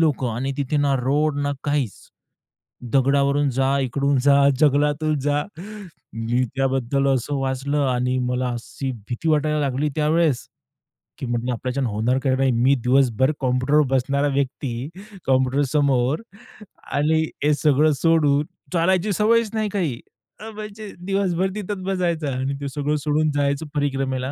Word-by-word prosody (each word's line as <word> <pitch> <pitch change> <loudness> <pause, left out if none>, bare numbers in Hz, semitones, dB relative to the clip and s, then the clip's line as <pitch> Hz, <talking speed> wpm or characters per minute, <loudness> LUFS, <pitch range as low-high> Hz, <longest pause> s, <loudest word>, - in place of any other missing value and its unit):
लोकं 140 -6 +1
आणि 135 +4 -2
तिथे 140 +1 -1
ना 145 -1 +2
रोड 145 +3 +1
ना 145 0 0
काहीच. 145 -7 0 1.0
दगडावरून 140 +1 +2
जा, 135 +1 +2
इकडून 140 +2 0
जा, 140 0 +5
जंगलातून 150 +1 +2
जा. 145 +1 0 0.7
मी 115 +2 0
त्याबद्दल 135 0 0
असं 135 +3 -2
वाचलं 135 +2 -1
आणि 125 0 0
मला 125 0 -1
अशी 120 +3 -5 0.2
भीती 130 +7 -3
वाटायला 150 0 +1
लागली 140 +1 0
त्यावेळेस, 155 -3 +1 0.7
की - - -4
म्हंटलं 120 +1 -1
आपल्याचानं 130 +1 -2
होणार 110 +5 0
काय 130 -2 +2
नाही? 135 0 +2
मी 125 +4 +3
दिवसभर 130 0 +3
कॉम्प्युटरवर 130 +4 +2
बसणारा 140 +3 +1
व्यक्ती, 135 -1 -2 0.4
कॉम्प्युटर 130 +1 +2
समोर 140 - +2 0.7
आणि 155 +2 +2 0.2
हे 150 - +4
सगळं 150 +1 +3
सोडून 150 -3 +3 0.3
चालायची 185 +4 +2
सवयच 225 +3 +2
नाही 215 -1 -1
काही. 170 - -2 0.4
अ, 220 - -8
म्हणजे 210 0 -8
दिवसभर 190 -1 0
तिथेच 205 -1 -4
बसायचं 175 -6 -1
आणि 135 +2 -2
ते 140 - -3
सगळं 145 +2 -1
सोडून 155 0 +1
जायचं 140 +2 0
परिक्रमेला. 135 -2 -1
140 Hz, 140 wpm, -22 LUFS, 130-155 Hz, 1.0 s, जा